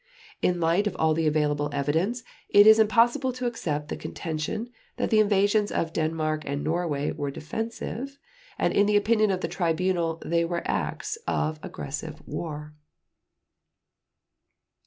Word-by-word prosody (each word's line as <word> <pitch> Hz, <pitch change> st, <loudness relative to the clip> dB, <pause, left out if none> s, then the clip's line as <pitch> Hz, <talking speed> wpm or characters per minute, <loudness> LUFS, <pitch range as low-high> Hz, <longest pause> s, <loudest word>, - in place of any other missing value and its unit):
In 180 Hz, -, +2 dB
the 175 Hz, -, -5 dB
light 180 Hz, +6 st, +2 dB
of 190 Hz, -, -3 dB
all 160 Hz, 0 st, +3 dB
the 160 Hz, 0 st, +1 dB
available 150 Hz, -1 st, +1 dB
evidence 160 Hz, -, 0 dB, 0.3 s
it 205 Hz, 0 st, +7 dB
is 220 Hz, +1 st, +8 dB
impossible 240 Hz, +5 st, +3 dB
to 255 Hz, 0 st, -5 dB
accept 150 Hz, -11 st, -2 dB
the -, -, -2 dB
contention 165 Hz, +9 st, -4 dB, 0.3 s
that -, -, -1 dB
the 220 Hz, -, +5 dB
invasions 205 Hz, 0 st, +3 dB
of 165 Hz, -1 st, -1 dB
Denmark 155 Hz, -1 st, -1 dB
and 140 Hz, 0 st, -3 dB
Norway 155 Hz, -3 st, -1 dB
were 145 Hz, -, -3 dB
defensive, 225 Hz, -, -5 dB, 0.4 s
and -, -, +1 dB
in 205 Hz, -, +4 dB
the 210 Hz, 0 st, +4 dB
opinion 215 Hz, 0 st, +3 dB
of 185 Hz, -1 st, 0 dB
the -, -, -1 dB
Tribunal 170 Hz, -1 st, 0 dB
they 170 Hz, +1 st, +2 dB
were 170 Hz, 0 st, -2 dB
acts 450 Hz, -, -2 dB
of 155 Hz, 0 st, -1 dB
aggressive 150 Hz, +3 st, -6 dB
war. 150 Hz, -2 st, -5 dB
170 Hz, 150 wpm, -26 LUFS, 155-215 Hz, 0.4 s, is